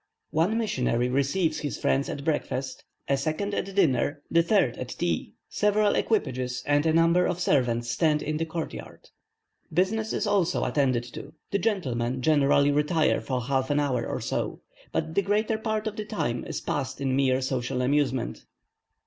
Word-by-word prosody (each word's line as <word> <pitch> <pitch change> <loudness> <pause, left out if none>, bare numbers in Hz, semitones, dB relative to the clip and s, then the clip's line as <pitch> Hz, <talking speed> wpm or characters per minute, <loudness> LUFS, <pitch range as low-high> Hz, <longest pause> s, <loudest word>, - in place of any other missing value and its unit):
One 170 +8 +2
missionary 125 - 0
receives 155 +5 +1
his 145 - -3
friends 140 +1 +1
at 140 - -5
breakfast, 135 -4 -2 0.2
a 140 - +3
second 155 +9 -2
at 195 -1 -3
dinner, 145 -5 +2
the 170 - +5
third 170 - +2
at 125 - -5
tea, 85 -9 -2
several 210 0 +2
equipages 130 - -1
and 145 +2 +2
a - - +4
number 165 +2 +4
of 180 -1 -2
servants 120 -7 +1
stand 150 +5 +2
in 155 +1 -2
the 165 - -1
court 160 0 -4
yard. - - -11 0.6
Business 210 +6 +1
is - - -1
also 200 -5 +1
attended 130 -5 +1
to: 150 +3 -9 0.2
the 200 - +1
gentleman 130 - -1
generally 145 -1 +4
retire 150 +2 +2
for 130 -2 -2
half 130 +1 -1
an 145 0 +2
hour 130 -5 0
or - - -3
so; - - -3 0.3
but 160 0 -2
the 200 - +3
greater 215 +2 0
part 220 -1 -2
of 215 -1 -4
the 215 - -3
time 120 - -2
is - - -4
passed 135 -2 -3
in 135 -2 0
mere 130 -1 +2
social 125 -1 -2
amusement. 130 -2 0
145 Hz, 175 wpm, -26 LUFS, 130-185 Hz, 0.6 s, the